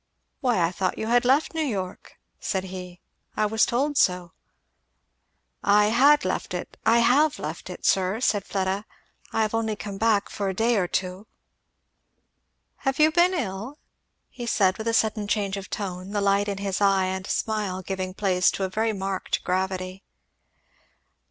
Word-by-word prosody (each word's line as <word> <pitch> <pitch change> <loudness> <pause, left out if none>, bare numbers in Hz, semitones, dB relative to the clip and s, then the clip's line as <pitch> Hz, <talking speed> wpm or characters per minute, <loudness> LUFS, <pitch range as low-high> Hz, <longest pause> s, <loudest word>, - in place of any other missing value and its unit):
"Why 245 -7 +1
I 165 - +1
thought 185 0 -2
you - - -3
had 245 +1 +3
left 275 +7 +3
New 320 - -1
York," 195 -11 -4 0.2
said 190 -2 -2
he; 180 -1 -8 0.4
"I 215 - +2
was 220 +1 +2
told 280 +4 0
so." 180 -1 +2 1.3
"I 210 +1 +4
had 285 +5 +5
left - - -2
it - - -6
I 235 +1 +5
have 290 +5 +4
left - - -6
it, - - -8
sir," 190 +3 +2
said 205 -5 +1
Fleda; 195 +1 -2 0.5
"I 225 - +1
have 215 - -2
only 225 -1 0
come 200 -1 -7
back 220 -2 +2
for 200 -1 -3
a 190 - -3
day 230 +4 +2
or 180 -3 +1
two 185 +3 -3 0.7
" - - -50
"Have 270 - +1
you 310 +1 +5
been 350 +3 +3
ill?" 225 - -4 0.5
he 240 -2 -7
said 190 -4 +2
with 220 - -4
a 230 - +1
sudden 215 -2 +1
change 200 -2 0
of 195 0 -7
tone, 190 -2 -5
the 205 - +1
light 200 +1 +2
in 200 -1 -2
his 195 0 -3
eye 195 -1 +4
and 190 +1 -3
smile 205 -4 -2
giving 185 0 -4
place 185 -3 +2
to 195 - -3
a 190 - -1
very 220 +3 0
marked 195 -1 -3
gravity. 185 +1 -2
200 Hz, 175 wpm, -25 LUFS, 190-225 Hz, 1.3 s, had